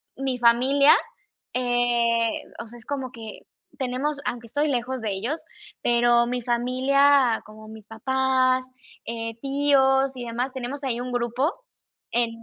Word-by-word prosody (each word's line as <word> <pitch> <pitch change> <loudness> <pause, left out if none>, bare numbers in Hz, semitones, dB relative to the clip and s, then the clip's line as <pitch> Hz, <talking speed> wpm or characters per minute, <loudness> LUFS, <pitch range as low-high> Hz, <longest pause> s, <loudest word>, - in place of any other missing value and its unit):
mi 265 -1 -2
familia, 255 +5 +5 0.6
eh, 240 -2 +1 0.3
o - - -9
sea, 240 - -9
es 230 - -16
como 270 -3 -4
que 225 -4 -9 0.4
tenemos 265 +3 -2
aunque 235 -1 -4
estoy 290 +6 0
lejos 255 -1 -2
de 215 - -2
ellos, 230 +12 -3 0.4
pero 240 0 +3
mi 250 0 -2
familia, 255 +1 +3
como 215 0 -13
mis 220 -1 -12
papás, 260 +2 +1 0.4
eh, 230 -1 -4
tíos 270 -1 +2
y 245 - -6
demás, 240 +3 -3
tenemos 265 +3 -5
ahí 245 -3 -1
un 250 - -5
grupo 245 +6 0 0.6
en 235 -1 +2
250 Hz, 140 wpm, -24 LUFS, 235-265 Hz, 0.6 s, familia